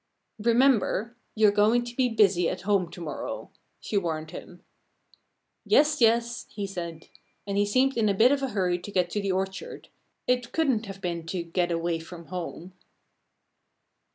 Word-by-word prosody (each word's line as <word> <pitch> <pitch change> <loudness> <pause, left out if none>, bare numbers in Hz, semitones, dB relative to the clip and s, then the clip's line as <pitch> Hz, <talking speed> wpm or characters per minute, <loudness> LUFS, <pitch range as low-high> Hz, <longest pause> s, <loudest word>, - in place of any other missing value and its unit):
"Remember! 235 -1 +2 0.2
You're 215 -2 +5
going 215 +4 +3
to 240 0 -8
be 255 -1 +2
busy 195 -6 +3
at 180 - -4
home 195 -3 +1
to 175 - -11
morrow!" 160 -4 -5 0.3
she 210 - -2
warned 160 -4 -2
him. 175 0 -10 1.0
"Yes! 300 -1 +3
yes!" 235 +1 +2
he 205 - -4
said. 170 -4 -7 0.4
And 200 -1 -3
he 205 0 +2
seemed 260 +6 +2
in 220 -3 +2
a 200 - +1
bit 235 +6 +5
of 285 -1 +1
a 270 - 0
hurry 180 -5 0
to 205 - -9
get 180 -3 +1
to 205 - -1
the 200 -1 -1
orchard 190 +1 -4 0.4
it 250 -1 0
couldn't 260 -9 +1
have 195 0 -8
been 170 -2 -3
to 175 0 -3
get 175 +1 -1
away 165 0 -1
from 170 0 -11
home. 180 0 -6
200 Hz, 170 wpm, -27 LUFS, 175-235 Hz, 1.0 s, You're